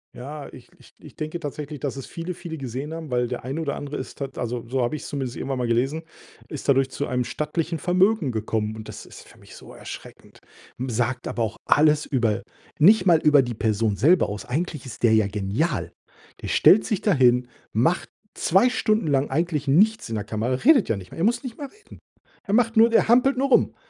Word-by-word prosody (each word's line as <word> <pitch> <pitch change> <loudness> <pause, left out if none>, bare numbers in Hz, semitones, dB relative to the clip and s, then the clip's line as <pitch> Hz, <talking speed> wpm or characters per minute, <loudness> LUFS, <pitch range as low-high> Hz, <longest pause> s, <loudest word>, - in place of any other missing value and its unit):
Ja, 145 +3 -8
ich - - -14
ich - - -19
ich - - -15
denke 155 +2 -5
tatsächlich, 150 -1 -6
dass 140 -1 -3
es 135 - -6
viele 170 +2 -6
viele 170 -2 -7
gesehen 135 +3 -5
haben, 160 -4 -7
weil 125 0 +1
der 125 0 -5
eine 135 +6 -4
oder 145 -3 -2
andere 145 0 -6
ist - - -7
tat 135 -1 -6
also 120 0 -3
so 130 +1 0
habe 120 +5 -1
ich 150 - -6
es - - -8
zumindest 135 -4 -4
irgendwann 135 -1 -3
mal 125 -1 -1
gelesen, 135 +7 0 0.4
ist 145 -2 -6
dadurch 135 -1 +3
zu 140 - -4
einem 125 -1 -1
stattlichen 160 +4 -3
Vermögen 180 - +2
gekommen. 110 -1 -2
Und 110 - -9
das - - -9
ist - - -13
für - - -18
mich - - -15
so - - -13
erschreckend, - - -11 0.4
hm, 130 +1 -4
sagt 120 +1 -2
aber 120 - -2
auch 110 +1 -4
alles 150 0 +4
über 115 -6 0 0.4
nicht 195 +5 +6
mal 170 -4 +5
über 150 -2 +5
die 120 -2 -4
Person 110 -1 0
selber 170 +6 +4
aus. 105 +1 -6
Eigentlich 150 0 -3
ist 120 -2 -10
der 115 -2 +5
ja 110 -2 +3
genial. 105 - -2 0.5
Der - - -6
stellt 210 - +5
sich 210 - -1
dahin, 125 - +3 0.3
macht 130 - +1 0.3
2 195 +8 +3
Stunden 215 -6 0
lang 140 -1 +1
eigentlich 160 -4 -1
nichts 210 +11 +3
in 115 - -4
der 105 - -2
Kamera, 110 +3 -2
redet 250 - +4
ja 115 - 0
nicht 95 -2 -10
mal. - - -11
Er 165 - -2
muss 235 +4 +1
nicht 250 -4 -7
mal 285 - -6
reden. 420 +7 -17 0.5
Der 200 - -1
macht 230 0 +2
nur 225 +1 +7
der 230 - +3
hampelt 255 +2 +4
nur 275 +1 +1
rum, - - +3
140 Hz, 225 wpm, -24 LUFS, 120-170 Hz, 0.5 s, nur